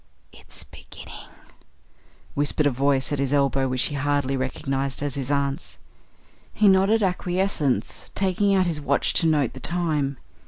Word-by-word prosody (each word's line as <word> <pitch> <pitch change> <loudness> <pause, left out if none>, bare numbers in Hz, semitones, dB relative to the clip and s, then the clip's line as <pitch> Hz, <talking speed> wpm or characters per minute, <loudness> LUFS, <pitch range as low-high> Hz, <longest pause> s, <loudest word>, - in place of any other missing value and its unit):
"It's - - -14
beginning," - - -12 1.0
whispered 145 +1 +1
a 145 - +3
voice 135 +1 +1
at 145 - -1
his 140 0 0
elbow 135 -1 +2
which 130 0 0
he - - -1
hardly 145 -1 0
recognised 135 +1 -2
as 145 -2 -2
his 135 -2 -3
aunt's. 140 +2 -1 0.7
He 215 - +2
nodded 195 +3 +4
acquiescence, 180 -6 0
taking 195 +1 +1
out 185 -1 +3
his 160 -4 -2
watch 140 0 +1
to 165 - +2
note 150 -6 +1
the - - -9
time. 155 -6 -1
145 Hz, 150 wpm, -24 LUFS, 135-175 Hz, 1.0 s, nodded